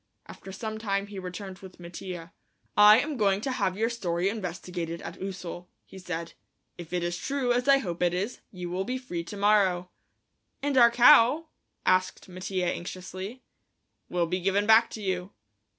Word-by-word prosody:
After 195 - -11
some 220 +2 -5
time 200 -2 -1
he 200 -1 -8
returned 185 +1 -7
with 190 -2 -13
Mattia. 175 0 -8 0.4
"I 210 +1 +9
am 290 +1 -2
going 200 -3 +2
to 265 - -2
have 190 -7 -1
your 225 +2 +1
story 180 -5 -1
investigated 180 -4 -5
at - - -8
Ussel," 180 -2 -6 0.2
he 190 - -12
said. 170 -2 -5 0.4
"If 170 -2 -10
it 180 -1 -1
is 175 0 -2
true, 270 -3 0
as 245 +2 0
I 275 0 +7
hope 175 -10 -4
it 175 -1 +3
is, 195 +7 -3
you 180 -2 -7
will 185 +2 -1
be 255 +5 -3
free 180 -10 -5
to 205 - -8
morrow." 195 -3 +2 0.7
"And 285 -1 0
our 240 -2 +8
cow?" 255 +5 +6 0.4
asked 185 0 +1
Mattia 185 0 -3
anxiously. 185 +6 -5 0.7
"Will 175 -1 +1
be 180 +3 -2
given 195 +2 +1
back 220 +1 +6
to 220 - -8
you." 185 0 -2
190 Hz, 175 wpm, -28 LUFS, 180-220 Hz, 0.7 s, I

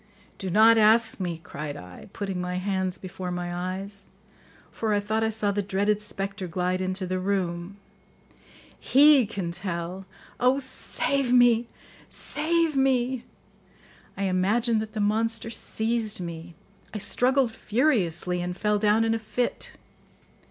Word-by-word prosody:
"Do 190 - -3
not 220 +4 +6
ask 225 +1 +4
me," 175 -3 -3
cried 145 -1 -6
I, 90 - -11
putting 195 -4 -4
my 180 0 -3
hands 185 0 -1
before 185 0 -6
my 175 0 -3
eyes, 190 +3 -5 0.7
for 220 -2 -1
I - - +2
thought 215 +2 -1
I 220 - +2
saw 215 -2 0
the 205 +1 0
dreaded 200 +2 0
spectre 195 -2 -4
glide 180 +2 -1
into 185 +1 -2
the 185 0 -2
room; 185 -1 -2 1.0
"he 280 -3 +6
can 195 -5 -4
tell. 180 +1 -5 0.3
Oh, 255 +2 +4
save 270 0 -1
me! 240 -1 +5 0.4
Save 325 0 0
me!" 260 -2 +1 0.9
I 200 - -2
imagined 215 +5 +1
that 215 0 -7
the 220 - -4
monster 225 +2 0
seized 220 -2 -1
me; 170 -1 -7 0.4
I - - -5
struggled 250 +4 +2
furiously 195 - 0
and 180 +1 -4
fell 210 0 +1
down 210 +1 +3
in 225 - +2
a 225 - -1
fit. 230 +3 -3
205 Hz, 140 wpm, -26 LUFS, 185-230 Hz, 1.0 s, not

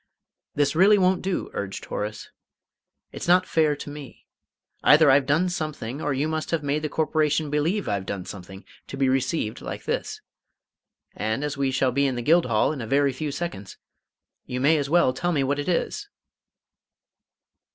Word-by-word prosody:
"This 145 +1 +1
really 200 +5 +6
won't 185 -1 +2
do!" 190 -1 -3
urged 100 -1 -5
Horace. 105 +1 -5 0.8
"It's - - -7
not 180 +1 +5
fair 155 -4 +2
to 145 - -9
me. 145 -2 -11 0.6
Either 150 -1 +6
I've 135 0 +3
done 160 +6 +2
something, 155 -6 -4
or 145 - -1
you 140 +3 0
must 155 0 -3
have 165 -3 -1
made 145 +2 -1
the 155 - -3
Corporation 155 -1 0
believe 165 +8 0
I've 100 -2 -2
done 95 -3 -4
something, 95 0 -10 0.2
to 135 - -7
be 135 -1 +2
received 130 -3 -1
like - - -6
this. - - -3 1.0
And, 110 +6 -2
as 150 -1 -2
we 140 -1 0
shall 130 0 +1
be 140 +2 +2
in 130 - -2
the 120 - -4
Guildhall 135 -8 +3
in 145 -5 -5
a 115 - -5
very 140 +2 +2
few 145 +3 -4
seconds, 140 - -6 0.7
you 125 - -3
may 150 +5 +4
as 140 -1 -3
well 170 -5 +3
tell 175 +7 -1
me 145 -5 +1
what 140 +2 -1
it 145 - -3
is!" 410 - -2
145 Hz, 180 wpm, -24 LUFS, 130-160 Hz, 1.0 s, really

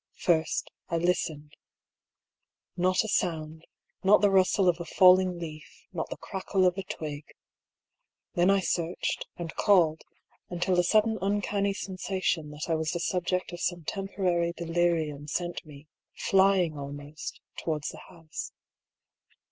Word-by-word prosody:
First, 160 -3 +1 0.2
I 170 - 0
listened. 160 -3 -1 1.2
Not 185 +3 +2
a - - -4
sound; 160 -5 -2 0.4
not 195 +2 +6
the 205 -1 +4
rustle 190 0 +4
of 175 -1 +3
a - - -3
falling 185 0 +5
leaf, 155 -3 -9
not - - -3
the - - -5
crackle 190 -1 -1
of 180 -1 +3
a 195 - -3
twig. 150 -5 -6 1.1
Then 180 0 +3
I 195 0 +4
searched, 175 -1 -2
and 170 -2 -5
called; 170 -6 +3 0.5
until 180 +1 +1
a - - +4
sudden 220 +4 +3
uncanny 200 0 0
sensation 185 -5 -2
that 150 +1 -6
I 165 - +1
was 160 -1 0
the 175 - -2
subject 180 +1 -1
of 175 - -6
some 175 -2 -1
temporary 180 -2 -1
delirium 165 -4 0
sent 175 +3 -3
me, 145 0 -12 0.3
flying 190 -5 +3
almost, 145 +2 -7 0.2
to - - -8
wards 150 -1 -1
the - - -9
house. 165 -3 -8
175 Hz, 140 wpm, -28 LUFS, 160-190 Hz, 1.2 s, not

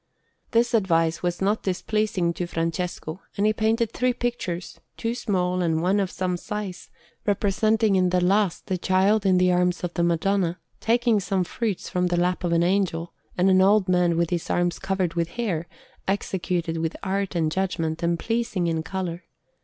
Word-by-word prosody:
This 235 +1 +2
advice 165 -6 +2
was 175 +1 -1
not 205 +3 +1
displeasing 190 -2 0
to 175 +1 -3
Francesco, 165 +1 -3 0.2
and 200 - +2
he 215 - +4
painted 220 +1 +1
three 250 +1 +1
pictures, 235 -8 -4 0.2
two 230 0 -1
small 185 -6 0
and 165 -2 +1
one 185 +5 +2
of 195 -2 0
some 180 -1 -2
size, 205 -1 -6 0.4
representing 210 +1 +2
in 185 -1 +3
the 180 0 +2
last 190 0 +1
the 185 -3 -2
Child 195 +3 +2
in 185 -1 +4
the 180 0 +4
arms 180 0 +1
of 175 -1 -3
the 175 - -1
Madonna, 175 +1 +1 0.2
taking 235 -1 +2
some 195 -1 0
fruits 210 +1 -3
from 180 0 0
the 175 0 0
lap 180 +1 0
of 175 - 0
an 170 0 +3
Angel, 175 -2 0 0.2
and 180 +1 +3
an 185 0 +5
old 200 0 +4
man 180 -2 +2
with 170 0 +1
his 175 -2 -2
arms 175 0 0
covered 190 -3 -1
with 170 -1 0
hair, 175 -9 -1 0.4
executed 180 -4 -1
with 165 0 -2
art 195 0 -1
and 160 -2 +1
judgment, 165 -3 -1
and 170 0 +1
pleasing 225 -2 -1
in 165 -1 0
colour. 180 0 -4
185 Hz, 180 wpm, -25 LUFS, 170-205 Hz, 0.4 s, an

